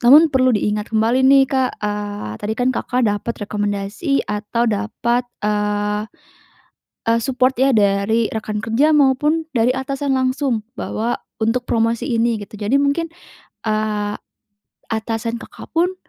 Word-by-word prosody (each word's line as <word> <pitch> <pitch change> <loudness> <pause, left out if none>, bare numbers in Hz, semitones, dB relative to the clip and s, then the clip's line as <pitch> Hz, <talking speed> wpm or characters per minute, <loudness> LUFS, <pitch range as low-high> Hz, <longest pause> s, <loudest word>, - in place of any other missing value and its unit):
namun 295 +7 +8
perlu 255 -1 +4
diingat 210 +1 -1
kembali 225 +4 +2
nih, 270 0 +7
Kak, 260 -1 0
eee, 205 - -3
tadi 215 +1 -2
kan 250 +1 +2
Kakak 250 +2 0
dapat 205 +3 -2
rekomendasi 205 - -1
atau 210 +3 -1
dapat, 235 +4 -1 0.2
eee 210 0 0 1.0
eee, 230 0 +3
support 260 -1 +1
ya 270 +1 +4
dari 205 +2 +2
rekan 215 -1 -3
kerja 255 +8 +3
maupun 295 +3 +3
dari 235 +2 +3
atasan 275 +1 -2
langsung 260 -3 0
bahwa 230 0 -2 0.3
untuk 235 +3 +1
promosi 230 0 +1
ini 235 -1 +2
gitu. 205 - -12
Jadi 210 +6 +1
mungkin, 285 +4 +1 0.6
eee, 210 -1 -1 0.8
atasan 225 +1 -2
Kakak - - -11
pun 355 +3 +2
230 Hz, 135 wpm, -20 LUFS, 210-260 Hz, 1.0 s, namun